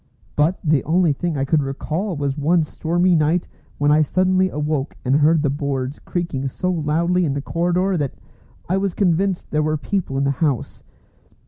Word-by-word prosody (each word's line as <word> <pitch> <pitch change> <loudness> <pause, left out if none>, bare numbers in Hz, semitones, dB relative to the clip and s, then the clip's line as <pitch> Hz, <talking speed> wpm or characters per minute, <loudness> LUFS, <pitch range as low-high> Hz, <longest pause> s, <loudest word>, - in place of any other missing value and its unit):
But 155 +5 +2
the 150 -5 +2
only 170 0 +2
thing 165 +2 -3
I 135 - 0
could 150 +2 +2
recall 155 +7 -3
was 140 -1 -1
one 160 +3 +2
stormy 175 +4 +1
night 165 +2 +2 0.3
when 145 0 +2
I 155 +1 +5
suddenly 185 +4 +2
awoke 150 -2 -2
and 130 +3 +3
heard 155 +1 +3
the 145 - +2
boards 140 -1 -3
creaking 170 -7 -3
so 180 +7 -2
loudly 170 +2 +1
in 145 -4 0
the - - -1
corridor 180 +4 0
that 145 -4 -2 0.5
I 185 - +1
was 195 -2 -1
convinced 185 0 0
there 150 - +1
were 155 0 0
people 165 -3 -2
in 135 - +1
the 140 - +2
house. 140 -7 -1
155 Hz, 185 wpm, -21 LUFS, 145-180 Hz, 0.5 s, I